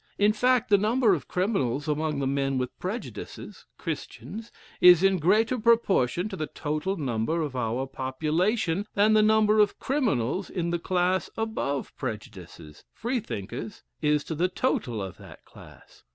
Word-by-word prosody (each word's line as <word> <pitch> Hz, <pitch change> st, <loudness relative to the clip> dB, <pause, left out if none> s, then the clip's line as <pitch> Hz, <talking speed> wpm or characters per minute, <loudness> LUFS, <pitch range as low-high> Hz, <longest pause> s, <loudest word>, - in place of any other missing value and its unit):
In 205 Hz, +1 st, +4 dB
fact, 250 Hz, +1 st, +2 dB
the 200 Hz, -, +6 dB
number 220 Hz, +1 st, +3 dB
of 155 Hz, -7 st, -3 dB
criminals 150 Hz, -, -1 dB
among 150 Hz, 0 st, -1 dB
the 140 Hz, -, -1 dB
men 135 Hz, 0 st, 0 dB
with 125 Hz, -1 st, -3 dB
prejudices 205 Hz, +7 st, -7 dB
(Christians) 225 Hz, +2 st, -6 dB, 0.3 s
is 180 Hz, 0 st, +8 dB
in 195 Hz, -1 st, +4 dB
greater 220 Hz, +9 st, +2 dB
proportion 205 Hz, -, +2 dB
to 195 Hz, -, -5 dB
the 155 Hz, -4 st, -3 dB
total 155 Hz, +6 st, -3 dB
number 140 Hz, +3 st, -1 dB
of 145 Hz, -4 st, -5 dB
our 125 Hz, +1 st, -1 dB
population, 160 Hz, -, -1 dB
than 210 Hz, +2 st, +4 dB
the 215 Hz, -, +6 dB
number 215 Hz, 0 st, +4 dB
of 210 Hz, -1 st, +3 dB
criminals 195 Hz, -, -1 dB
in 170 Hz, -3 st, -2 dB
the 175 Hz, -, 0 dB
class 180 Hz, +1 st, 0 dB
above 220 Hz, -11 st, -2 dB
prejudices 95 Hz, -, -8 dB
(Freethinkers) 210 Hz, -, -5 dB, 0.2 s
is 150 Hz, -1 st, +2 dB
to -, -, -5 dB
the 170 Hz, +4 st, +1 dB
total 120 Hz, -, -1 dB
of 95 Hz, -2 st, -7 dB
that -, -, -14 dB
class. -, -, -16 dB
175 Hz, 150 wpm, -27 LUFS, 135-215 Hz, 0.3 s, is